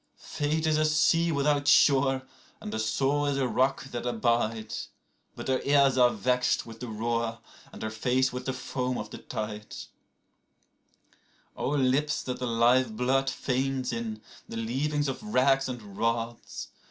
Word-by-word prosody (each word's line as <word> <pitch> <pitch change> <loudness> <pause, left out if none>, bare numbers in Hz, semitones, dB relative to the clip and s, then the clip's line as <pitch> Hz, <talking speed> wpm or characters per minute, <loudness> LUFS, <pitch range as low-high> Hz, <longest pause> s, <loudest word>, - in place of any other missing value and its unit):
41Fate 155 +2 -2
is 155 -1 +2
a 155 - +3
sea 165 +2 +3
without 145 -1 +1
shore, 135 -2 +5 0.4
and 105 - -7
the 110 - -2
soul 140 +6 +1
is 140 -1 0
a 135 -2 +1
rock 130 +2 +1
that 120 - -4
abides;42But 115 -2 -3
her 130 -1 +1
ears 140 -2 +4
are 125 -1 +6
vexed 125 +3 +1
with 115 -1 -11
the 125 - -6
roar 115 +1 -2 0.3
and - - -9
her 110 - -3
face 125 +4 +1
with 125 - -5
the - - +1
foam 125 0 -3
of 105 0 -6
the - - -8 2.4
tides.43O 135 -2 +1
lips 150 +3 0
that 125 -1 -4
the 125 - -2
live 120 0 +3
blood 135 +2 +2
faints 130 -1 -1
in, 110 -2 -4 0.3
the 115 - -5
leavings 140 +6 -1
of 135 - -4
racks 135 -10 +2
and 110 -6 -7
rods! 115 +2 -2
130 Hz, 155 wpm, -28 LUFS, 115-140 Hz, 2.4 s, are